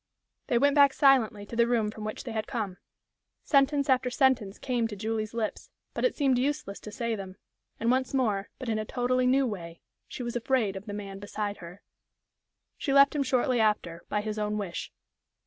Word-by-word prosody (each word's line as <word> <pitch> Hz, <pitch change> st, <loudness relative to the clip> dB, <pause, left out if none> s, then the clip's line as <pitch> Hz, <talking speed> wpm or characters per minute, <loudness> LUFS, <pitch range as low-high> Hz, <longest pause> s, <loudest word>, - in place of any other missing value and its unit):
They 240 Hz, -, +2 dB
went 285 Hz, +3 st, +4 dB
back 280 Hz, -2 st, +6 dB
silently 240 Hz, -7 st, +3 dB
to 230 Hz, -, -8 dB
the 235 Hz, 0 st, +4 dB
room 225 Hz, -3 st, +1 dB
from 215 Hz, 0 st, -9 dB
which 215 Hz, -, -5 dB
they 240 Hz, -, -6 dB
had 220 Hz, +1 st, -3 dB
come. 215 Hz, -9 st, -3 dB, 0.7 s
Sentence 280 Hz, 0 st, +3 dB
after 260 Hz, -2 st, +2 dB
sentence 245 Hz, -6 st, +2 dB
came 245 Hz, -3 st, -1 dB
to 215 Hz, -, -7 dB
Julie's 220 Hz, +1 st, -3 dB
lips, 220 Hz, -2 st, -3 dB, 0.2 s
but -, -, -3 dB
it -, -, +2 dB
seemed 270 Hz, -4 st, +2 dB
useless 265 Hz, -7 st, -2 dB
to 215 Hz, -, -9 dB
say 230 Hz, +2 st, -2 dB
them, 190 Hz, -2 st, -8 dB, 0.4 s
and 230 Hz, +1 st, +2 dB
once 260 Hz, 0 st, +1 dB
more, 215 Hz, -7 st, 0 dB
but 260 Hz, -, -7 dB
in 220 Hz, -1 st, 0 dB
a -, -, -1 dB
totally 250 Hz, +2 st, +1 dB
new 265 Hz, +1 st, +4 dB
way, 170 Hz, -7 st, -6 dB, 0.3 s
she 250 Hz, -, -6 dB
was 240 Hz, 0 st, -4 dB
"afraid" 235 Hz, -4 st, +1 dB
of 190 Hz, +3 st, -8 dB
the 205 Hz, -, -5 dB
man 200 Hz, -1 st, -6 dB
beside 205 Hz, 0 st, -4 dB
her. 180 Hz, +3 st, -11 dB, 1.0 s
She 275 Hz, -, -1 dB
left 280 Hz, +1 st, +6 dB
him 290 Hz, -, +1 dB
shortly 255 Hz, -2 st, +1 dB
after, 210 Hz, -6 st, 0 dB
by 210 Hz, -, 0 dB
his 215 Hz, 0 st, -4 dB
own 210 Hz, 0 st, -1 dB
wish. 190 Hz, -5 st, -4 dB
230 Hz, 200 wpm, -28 LUFS, 210-260 Hz, 1.0 s, back